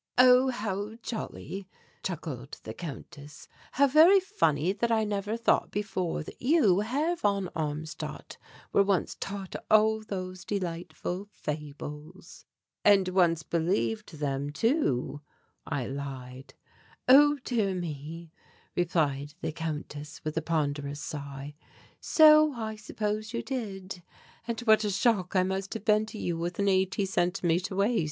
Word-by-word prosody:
"Oh, 255 +1 +7
how 210 -3 -3
jolly!" 195 -4 -6 0.3
chuckled 155 -8 -5
the 110 - -6
Countess. 145 0 -9 0.3
"How 280 - +5
very 320 +8 +7
funny 165 - +1
that 230 +3 -1
I 220 -1 +3
never 205 +1 -2
thought 230 - +2
before 190 -6 -2
that - - -12
you, 245 - +4
Herr 285 +11 0
von 200 - 0
Armstadt, 155 0 -5 0.3
were - - +6
once 195 -2 +1
taught 195 -1 -5
all 220 0 +4
those 185 -3 -6
delightful 180 0 -4
fables." 150 +1 -7 0.4
"And 195 -3 +5
once 170 -3 +3
believed 185 +6 -1
them 140 -1 -2
too," 150 - 0 0.5
I 145 -5 -2
lied. 130 -1 -7 0.5
"Oh, 290 +3 +7
dear 210 -6 0
me," 165 -1 -6 0.4
replied 150 -4 0
the - - -2
Countess, 150 -2 -6
with 155 0 -3
a 160 - 0
ponderous 145 -3 -1
sigh, 140 -1 -6 0.5
"so 305 -1 +6
I 220 -3 -4
suppose 215 0 -3
you 235 - -2
did. 195 -8 -5 0.5
And 235 0 -2
what 220 -2 +5
a 210 - 0
shock 200 -2 +1
I 185 - +5
must 190 +2 -3
have 220 - -6
been 215 0 +3
to 220 - -8
you 170 -4 -2
with 175 +1 -3
an 200 - +1
eighty 190 +1 +1
centimetre 180 0 0
waist." 205 +5 +2
190 Hz, 135 wpm, -29 LUFS, 155-215 Hz, 0.5 s, Oh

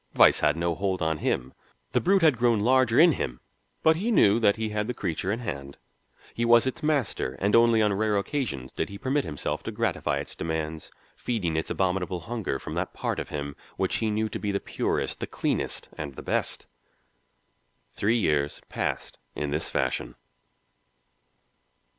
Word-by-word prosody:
Vice - - +6
had 75 +2 +2
no 85 0 0
hold 95 +1 -1
on 80 -1 0
him. 65 -3 -1 0.4
The - - +2
brute 190 0 +3
had 150 -7 +5
grown 120 -2 +3
larger 125 +1 +4
in 170 +1 +8
him, 60 - -3 0.4
but 160 0 +5
he 210 +7 -1
knew 110 - +5
that 100 -3 +4
he 110 -1 -2
had 105 0 -2
the 125 - -3
creature 90 0 -2
in 115 +3 -2
hand. 70 - -6 0.6
He 120 - -2
was 120 0 +6
its 130 - -3
master, 140 - 0
and 100 +2 +2
only 115 -1 +5
on 105 -1 +2
rare 105 +1 +1
occasions 100 - -2
did - - -3
he 100 - -7
permit 135 +6 0
himself 75 - -3
to - - -5
gratify 70 -2 -1
its 70 - -5
demands, 80 -1 -3 0.3
feeding 95 -10 -2
its 80 - -1
abominable 90 -1 -1
hunger 105 - -3
from - - -7
that - - -3
part - - -2
of - - -5
him 70 -1 -4 0.2
which - - 0
he 110 - 0
knew 110 +1 0
to - - -5
be 105 - -1
the 100 - 0
purest, - - -2
the - - -3
cleanest, - - -2
and 70 -3 -5
the - - -8
best. - - -1 1.3
Three 115 +4 +1
years 75 -8 +1
passed - - -3 0.2
in 75 -1 -2
this 75 +2 -1
fashion. 65 -1 -1
100 Hz, 185 wpm, -27 LUFS, 80-120 Hz, 1.3 s, in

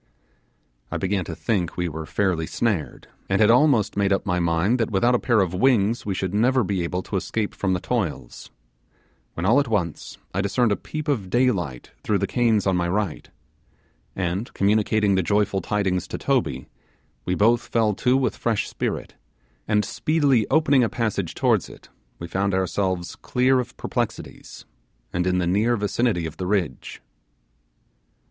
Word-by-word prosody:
I - - -3
began 95 -1 -1
to 80 - -6
think 90 -5 -2
we 90 0 0
were 80 0 -6
fairly 90 -5 0
snared, 95 - -2 0.2
and 95 0 +2
had 110 +1 +6
almost 125 -4 +3
made 100 -1 +1
up 95 - +1
my 90 -3 0
mind 85 +8 +1
that 115 - 0
without 115 +4 +2
a 125 - +3
pair 120 -4 +2
of 90 -2 -1
wings 115 +1 +2
we 100 - -1
should 95 0 -3
never 125 +4 +3
be 95 -2 -1
able 90 +2 -3
to 100 - -3
escape 105 +3 -2
from 95 -2 -1
the 90 - 0
toils; 90 - -4 0.9
when 85 - -3
all 115 +8 +5
at 140 - 0
once 95 -8 -2 0.2
I 95 - 0
discerned 105 +4 +1
a - - +3
peep 155 +7 -6
of 115 -11 -1
daylight 90 - 0
through 105 - +1
the 100 - 0
canes 115 -2 +1
on 95 -2 +2
my 85 -1 0
right, 100 -3 -2 0.9
and, 95 +4 -2
communicating 105 0 +2
the 95 - +2
joyful 100 +2 +1
tidings 95 -4 -1
to - - -5
Toby, 115 - -1 0.6
we 90 - 0
both 115 +5 +2
fell 110 -2 +1
to 125 +6 +2
with 135 -1 0
fresh 115 -3 -1
spirit, - - -4 0.5
and 105 -1 +2
speedily 145 -8 +1
opening 145 -4 +4
the 115 - +2
passage 105 -7 -2
towards - - +1
it - - -15 0.3
we 85 - -7
found 95 +2 0
ourselves 95 -1 -1
clear 130 +1 +1
of 125 - -5
perplexities, - - -5 0.5
and 90 +1 0
in 90 0 +2
the 90 - 0
near 105 +7 +2
vicinity 105 -3 0
of 80 - -7
the 90 - -3
ridge. 90 -10 -2
100 Hz, 175 wpm, -23 LUFS, 90-115 Hz, 0.9 s, had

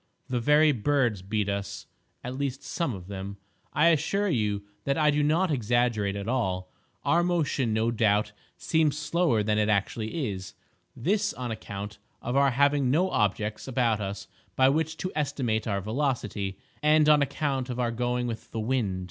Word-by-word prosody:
The 125 -1 0
very 150 +5 +5
birds 120 -4 +1
beat 105 +2 -1
us—at 100 +5 -6
least 135 -1 -3
some 155 - -2
of 90 -2 -9
them. 100 +1 -6 0.3
I 165 +3 +4
assure 170 +6 +1
you 105 - 0 0.2
that 140 0 0
I 150 -1 +4
do 145 +1 +1
not 160 +4 +2
exaggerate 120 -5 +1
at 100 +1 -5
all. 95 -7 -1 0.3
Our 170 - +3
motion, 155 -8 0
no 110 +2 +1
doubt, 105 -2 +2 0.3
seems 155 -3 +1
slower 150 -7 +1
than 105 0 +1
it 105 0 +2
actually 110 - -1
is—this 105 - -4
on 125 -2 -4
account 100 -1 -6 0.2
of 120 +2 -3
our 140 0 +5
having 140 0 +2
no 175 +8 +2
objects 105 +1 0
about 120 -4 +1
us 100 0 -5 0.3
by 130 0 +5
which 160 +2 0
to 185 +2 -3
estimate 130 -7 -1
our 100 -2 0
velocity, 110 -4 -2 0.2
and 150 0 +4
on 150 -1 +6
account 140 -2 -1
of 125 0 -4
our 120 -1 +1
going 125 +1 -1
with 115 -2 -5
the 115 - -4
wind. 110 -5 0
125 Hz, 165 wpm, -27 LUFS, 105-145 Hz, 0.3 s, on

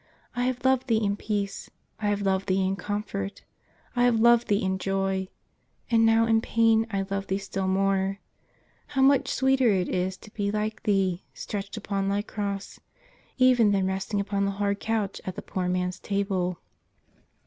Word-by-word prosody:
I 245 0 0
have 255 0 -2
loved 260 0 +3
Thee 230 -3 +3
in 200 0 +1
peace; 205 -2 -3 0.3
I 210 - -1
have 205 0 0
loved 195 0 0
Thee 190 0 +2
in 190 +1 0
com 205 +2 -3
fort; 200 -1 -5 0.5
I 245 0 +3
have 235 -2 +3
loved 235 +1 +5
Thee 205 0 +1
in 190 0 0
joy, 195 0 -1 0.3
— - - -30
and 225 -1 +5
now 225 0 +4
in 225 -1 +3
pain 225 -1 +3
I 195 -2 -1
love 195 0 -2
Thee 190 - 0
still 195 -1 -3
more. 195 0 +1 0.8
How 265 - +5
much 275 -1 +4
sweeter 265 -2 +3
it 185 -3 +1
is 185 +1 -1
to 215 - -15
be 205 -2 -1
like 215 +1 -2
Thee, 195 -4 0
stretched 200 +1 -5
upon 200 -2 -2
Thy 200 +1 0
Cross, 200 -2 -5 0.6
even 255 -4 +5
than 195 -1 +2
resting 190 +2 -2
upon 200 0 0
the 200 - 0
hard 200 0 0
couch 220 -3 -2
at 185 - -5
the - - -5
poor 185 -1 -3
man's 180 0 -1
table 195 -3 -1
200 Hz, 185 wpm, -26 LUFS, 195-225 Hz, 0.8 s, loved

